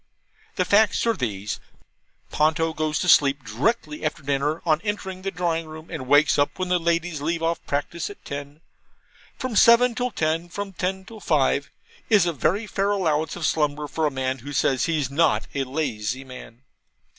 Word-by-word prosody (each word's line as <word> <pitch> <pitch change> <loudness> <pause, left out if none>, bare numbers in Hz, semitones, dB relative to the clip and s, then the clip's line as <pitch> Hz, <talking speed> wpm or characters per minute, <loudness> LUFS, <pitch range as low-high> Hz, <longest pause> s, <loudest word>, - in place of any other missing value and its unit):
The - - +1
facts 215 +3 +3
are 230 - +3
these. 105 - -3 0.7
Ponto 160 +1 +1
goes 155 -1 -1
to - - -1
sleep 140 -2 +4
directly 150 - -1
after 155 -2 -2
dinner 145 +3 -1
on 155 -1 +2
entering 195 -3 -4
the 195 - -2
drawing 170 -3 -2
room, 155 +2 -11
and 140 -7 -5
wakes 145 +2 +4
up 145 - +1
when 185 -1 -2
the 180 0 +2
ladies 170 -2 -1
leave 165 +2 -1
off 165 +1 -1
practice 145 +4 -2
at 205 - -13
ten. 145 +2 -7 0.8
From 255 -3 -4
seven 235 +3 +6
till 250 +2 -1
ten, 165 -3 -1
from 200 +1 -5
ten 190 +1 -3
till 220 +2 -11
five, 145 -5 +1 0.4
is 205 -5 +5
a 170 - 0
very 190 - 0
fair 200 -1 -1
allowance 160 -6 0
of 175 - -3
slumber 150 -1 0
for 155 +1 0
a - - +1
man 130 0 -2
who 145 +5 -8
says 130 -1 +2
he's 150 -5 -1
NOT 160 +4 +2
a 135 -1 -1
lazy 130 -4 -3
man. 125 -2 -12
155 Hz, 180 wpm, -24 LUFS, 140-180 Hz, 0.8 s, seven